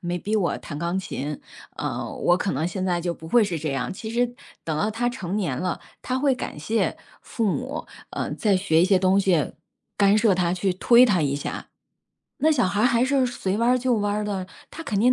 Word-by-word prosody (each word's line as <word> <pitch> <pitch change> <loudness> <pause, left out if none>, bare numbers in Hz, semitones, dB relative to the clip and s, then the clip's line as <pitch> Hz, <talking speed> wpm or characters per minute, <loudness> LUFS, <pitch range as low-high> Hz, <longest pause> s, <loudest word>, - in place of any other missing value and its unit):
没 175 -1 -2
逼 210 +5 -3
我 195 -5 +1
弹 145 - -8
钢 170 +4 -1
琴， 150 -5 -5 0.4
呃， - - -3
我 175 - +3
可 190 - -1
能 155 +5 -1
现 185 +1 -3
在 175 -2 0
就 170 0 -2
不 160 - -11
会 235 +1 +5
是 180 -4 -2
这 155 -1 -3
样。 130 +1 -2
其 220 +3 -7
实 245 +1 +2 0.4
等 155 -2 -2
到 210 +7 0
她 240 +3 0
成 195 -5 -4
年 165 -11 -1
了， 180 +4 -2 0.2
她 255 +1 -1
会 275 -1 +2
感 200 - -6
谢 220 +9 0 0.2
父 230 - -3
母， 265 +9 -2 0.2
呃， - - -3
在 205 -4 +2
学 170 -3 +3
一 - - +5
些 190 -1 +4
东 190 +1 +3
西， 180 -6 +1 0.4
干 205 +1 +4
涉 210 -3 +4
她 175 -1 +1
去 185 +1 0
推 240 +6 +6
她 185 -8 +2
一 140 -1 0
下。 - - -5 0.7
那 315 - +3
小 255 -9 +3
孩 205 +4 +1
还 240 0 +3
是 265 -1 +2
随 205 -4 -2
弯 235 +1 +2
儿 255 - +4
就 250 0 0
弯 205 0 0
儿 210 0 -1
的， 195 -3 -3 0.2
她 330 - -8
肯 205 -10 -2
定 250 +4 +5
195 Hz, 245 characters per minute, -24 LUFS, 175-235 Hz, 0.7 s, 推